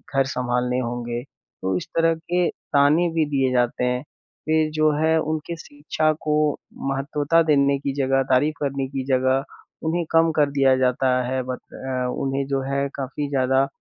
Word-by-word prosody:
घर 135 -1 +4
सँभालने 125 -1 -1
होंगे, 120 -1 -3
तो 95 -8 -6
इस - - -6
तरह 165 0 +3
के 175 +2 0
ताने 150 +5 +2
भी 160 -2 +2
दिए 135 -2 +1
जाते 125 0 +1
हैं। 125 +2 -1 0.4
फिर 155 0 +2
जो 155 0 +3
है 160 0 +3
उनके 155 +2 -3
शिक्षा 155 +1 -1
को 150 - 0 0.6
महत्वता 145 +4 +1
देने 140 -2 +3
की 140 -1 -3
जगह, 135 -1 +2
तारीफ 145 +4 +3
करने 140 -2 -2
की 135 -1 -4
जगह, 130 0 +2 0.4
उन्हें 165 +1 0
कम 165 0 +4
कर 145 -2 +3
दिया 135 -2 +4
जाता 130 0 +1 0.2
है, 130 0 -1
बत 130 0 -5
अ, 130 -1 -3
उन्हें 135 0 -1
जो 135 -1 0
है 140 0 0
काफ़ी 140 +1 -4
ज़्यादा 135 0 +2
140 Hz, 170 wpm, -23 LUFS, 130-155 Hz, 0.6 s, घर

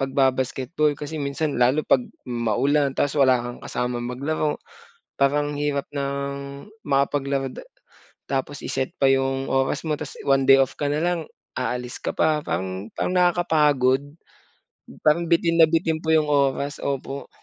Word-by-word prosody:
pagba-basketball, 135 +2 0
kasi 150 +1 -6
minsan, 140 0 -2
lalo 130 +5 +3
'pag 125 - +2 0.2
maulan, 130 +4 0
tapos 145 0 +1
wala 130 -2 +6
kang 120 0 -6
kasamang 120 0 -3
maglaro. 150 +4 -1 0.6
Parang 145 +1 +1
hirap 145 -1 -1
ng 140 +1 -4 0.2
makapaglaro 140 -1 0
da - - -8 0.7
tapos 135 +1 -2
i-set 130 -1 -2
pa - - +5
yung 135 0 +1
oras 135 0 +1
mo, 155 - 0
tas - - -7
one 135 -1 +3
day 135 - +9
off 135 - 0
ka 145 - -1
na - - 0
lang, 175 0 +1 0.4
aalis 125 0 -3
ka - - -2
pa, 155 -1 +2
parang 95 - -4
parang 180 - -1
nakakapagod, 150 -7 +3 1.1
parang 165 +2 +3
bitin 170 0 +3
na - - +8
bitin 160 -1 0
po 160 - -1
yung 155 -1 +4
oras. 140 0 0
Opo. 140 0 -4
140 Hz, 150 wpm, -23 LUFS, 130-150 Hz, 1.1 s, day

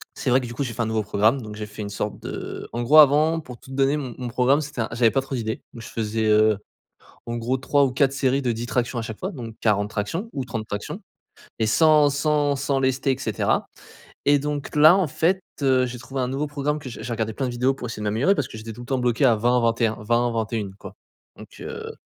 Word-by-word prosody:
c'est 135 - -2
vrai 125 +2 +5
que - - -5
du 120 - -7
coup, 140 - -2
j'ai 120 -4 -4
fait 115 - -3
un - - -2
nouveau 110 -1 0
programme 110 +6 +2
donc 105 -2 -8
j'ai 105 0 -5
fait 105 +1 -9
une 100 - -5
sorte 100 - -4
de - - -6
en 120 - -2
gros, 150 +6 +7
avant, 155 +3 +5
pour 125 -5 -11
tout 130 - -14
de - - -6
donner 135 +2 +2
mon 130 -5 -5
mon 125 -1 -4
programme, 130 +4 +3
c'était 145 -3 -7
un 110 - -1
j'avais 115 -1 +3
pas 135 - +1
trop 135 0 -5
d'idées, 110 -2 -3
donc 115 - -9
je - - -9
faisais, 110 0 -1
heu, 110 0 +4 0.7
en 120 - -3
gros 120 +3 -1
3 140 +2 +2
ou 130 - -1
4 135 +1 +2
séries 135 0 +1
de 125 -3 0
10 115 +2 -4
tractions 125 0 -1
à - - -2
chaque 110 -1 -7
fois 190 - -3
donc 115 - -7
40 105 -2 +2
tractions 115 - -3
ou 135 -3 -3
30 115 -4 -4
tractions 105 0 -5 0.6
et 110 - +2
sans 150 +4 +5
sans 145 0 +1
sans 140 0 0
lester, 135 +1 +1
et - - -6
cetera - - 0 0.6
et 145 0 +5
donc 145 -1 -4
là, 155 +4 +8
en 190 -5 +1
fait, 175 +7 +1 0.2
heu, 130 -2 +4
j'ai 125 0 -6
trouvé 135 +2 -5
un 125 - -1
nouveau 135 +3 -2
programme 145 +1 -2
que 135 - -8
j'ai 115 - -8
j'ai 120 - -4
regardé 110 -1 -2
plein 135 - -2
de 125 - -3
vidéos 125 +3 +1
pour 125 -2 -6
essayer 115 - -6
de - - -3
m'améliorer 115 - +2
parce 140 - -1
que - - -10
j'étais 110 +1 -7
tout 120 - -10
le - - -10
temps 135 -1 0
bloqué 125 +2 +1
à 120 - +5
20-21-20-21 115 -1 +1
quoi - - -10 0.4
donc, - - -11
heu, - - -6
125 Hz, 260 wpm, -23 LUFS, 115-140 Hz, 0.7 s, là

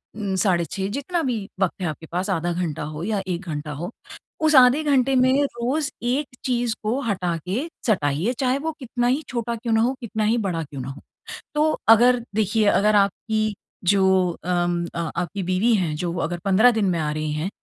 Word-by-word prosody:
उम, 200 -3 -2
साढ़े 180 -2 +2
6 190 +3 -3
जितना 340 +5 -2
भी 230 -7 -2
वक्त 190 0 0
है 180 - 0
आपके 155 +1 -6
पास, 180 +2 -2
आधा 175 +2 0
घंटा 170 -4 -3
हो 150 +2 -6
या 205 0 -1
1 175 -1 -2
घंटा 150 0 -4
हो। 155 +5 -5 0.5
उस 310 -1 +4
आधे 260 +4 +6
घंटे 270 -3 +2
में 260 +2 +4
रोज़ 275 +3 -1
एक 265 +4 0 0.2
चीज़ 245 -2 0
को 225 +5 0
हटा 190 -8 -1
के 240 - -1 0.2
सटाइए 170 - +1
चाहे 260 0 +2
वो 320 +3 -2
कितना 245 -2 -1
ही 260 +5 +1
छोटा 235 -1 -2
क्यों 230 0 -2
ना 220 - +4
हो, 245 +3 +2
कितना 220 -2 -3
ही 220 +3 +2
बड़ा 165 -3 -2
क्यों 140 -3 -8
ना 125 - -6
हो। 135 +2 -9 0.5
तो 305 +1 +3 0.2
अगर 240 +2 +6 0.2
देखिए, 215 +1 +2
अगर 210 +1 +4
आपकी 215 +2 +1 0.3
जो 190 -1 +3 0.2
अम 175 -1 0
अ, - - -2 0.2
आपकी 190 +3 -3
बीवी 185 +6 +2
हैं 170 -6 0
जो 170 +2 -3
अगर 175 +1 -4
15 205 +6 +5
दिन 220 -3 0
में 170 -2 0
आ 150 -1 -1
रही 155 0 -2
हैं, 155 +5 -2
205 Hz, 205 wpm, -23 LUFS, 175-245 Hz, 0.5 s, आधे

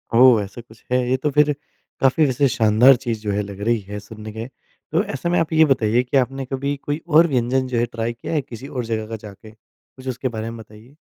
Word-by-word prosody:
ओह 125 -2 +7
ऐसा 100 +4 -9
कुछ 110 -1 -20
है। 125 - +3
ये 130 - +2
तो 150 - +2
फिर 150 +1 +4 0.5
काफ़ी 135 +4 +3
वैसे 140 +1 +2
शानदार 115 +4 +5
चीज़ 120 -3 -4
जो 105 -1 -2
है 100 +1 0
लग 100 -1 -9
रही 115 +2 +1
है 105 0 -5
सुनने 110 +1 -10
में। 110 +3 -6 0.4
तो 165 +5 +2
ऐसे 205 -4 -4
में 175 - +2
आप 165 0 -1
ये 160 0 +6
बताइए 120 -4 +2
कि 125 +2 0
आपने 135 +1 0
कभी 140 +2 -2
कोई 145 +2 -3
और 165 +1 +6
व्यंजन 130 -1 0
जो 125 -2 -2
है 120 - +2
ट्राई 115 0 -3
किया 120 - -6
है 155 - +1
किसी 125 0 -10
और 125 -4 -4
जगह 110 -1 -3
का 115 - -4
जाके? 110 0 -12
कुछ 130 +4 -19
उसके 130 +1 -2
बारे 115 -2 -4
में 115 - -7
बताइए। 110 +5 -15
125 Hz, 245 wpm, -21 LUFS, 110-135 Hz, 0.5 s, ओह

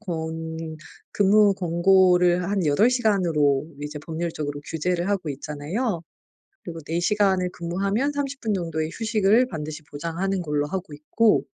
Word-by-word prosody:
권 160 -3 -5 0.4
근무 205 0 +4
권고를 180 0 +4
한 195 0 0
8 150 +12 +4
시간으로 170 - +2
이제 150 0 -5
법률적으로 160 -3 -4
규제를 175 +3 -1
하고 185 -7 -1
있잖아요. 160 - -3 0.6
그리고 165 -2 -7
4 165 +3 -2
시간을 190 -1 +2
근무하면 195 +10 -1
30 280 -1 -4
분 220 -3 0
정도의 165 -4 -2
휴식을 220 +2 +2
반드시 155 -6 -6
보장하는 170 +6 -3
걸로 150 -3 -1
하고 185 -1 -5
있고 210 +9 +2
175 Hz, 295 characters per minute, -24 LUFS, 160-200 Hz, 0.6 s, 근무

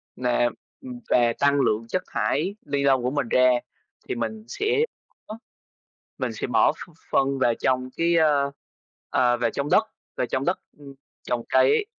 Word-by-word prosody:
nà, 120 -1 +1 0.3
ừm, 250 -2 -8
và 120 -1 +3
tăng 140 0 +3
lượng 115 -2 0
chất 185 - -2
thải 175 +9 -1
ni 140 -1 -1
lông 135 -3 +3
của 125 - 0
mình 140 -4 -2
ra, 125 0 +5 0.6
thì - - -2
mình 110 -2 -4
sẽ 435 - 0 0.5
ó, 215 +1 -8 0.8
mình - - -2
sẽ - - -4
bỏ - - +4
ph - - -11 0.2
phân 135 0 +1
vào 120 -3 +3
trong 130 +1 0
cái, 170 +1 +2
ơ, 145 -3 +3 0.6
ờ, 120 -1 +2
vào 120 -1 +1
trong 140 +1 -3
đất, 220 - +5 0.3
vào 125 - 0
trong 130 +2 -2
đất, 180 - 0 0.2
ưm, 140 -2 -12 0.3
trồng 120 -1 -2
cây 130 0 +4
ấy. 410 - +2
135 Hz, 180 wpm, -24 LUFS, 120-150 Hz, 0.8 s, ra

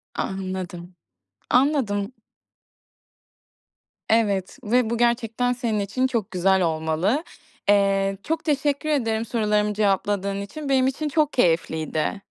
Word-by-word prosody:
Anladım, 185 -2 -5 0.6
anladım. 250 -6 +2 2.0
Evet 205 -4 +1
ve 235 +1 +2
bu 235 - -1
gerçekten 240 +1 +1
senin 235 -4 -1
için 225 +6 0
çok 230 -7 -2
güzel 190 +1 +2
olmalı. 165 - 0 0.5
Eee, 195 -1 +3
çok 325 0 -2
teşekkür 290 0 0
ederim 225 -6 0
sorularımı 210 -2 +1
cevapladığın 200 -1 0
için. 280 +9 -7
Benim 260 -1 +3
için 295 +3 -2
çok 300 -1 +1
keyifliydi. 165 -2 0
210 Hz, 105 wpm, -23 LUFS, 195-250 Hz, 2.0 s, Eee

